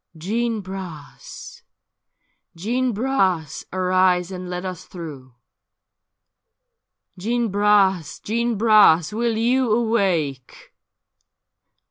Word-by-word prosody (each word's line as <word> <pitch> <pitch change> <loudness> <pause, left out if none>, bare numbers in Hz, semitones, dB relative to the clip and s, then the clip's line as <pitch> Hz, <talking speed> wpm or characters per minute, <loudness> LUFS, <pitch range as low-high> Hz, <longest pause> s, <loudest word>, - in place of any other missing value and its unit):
' - - -18
Jeanne 225 +6 -2
Bras! 185 -6 -9 0.9
Jeanne 240 +8 -1
Bras 195 - -1
1 185 - -4
arise 185 -1 +2
and 180 -1 -7
let 180 +1 -5
us 185 -2 -6
through; 140 -8 -10 1.8
Jeanne 235 +4 -1
Bras! 200 -4 +2
Jeanne 235 +2 -1
Bras! 210 -5 +5
will 230 0 -1
you 245 +1 +1
awake? 190 - -1
195 Hz, 90 wpm, -22 LUFS, 175-225 Hz, 1.8 s, Bras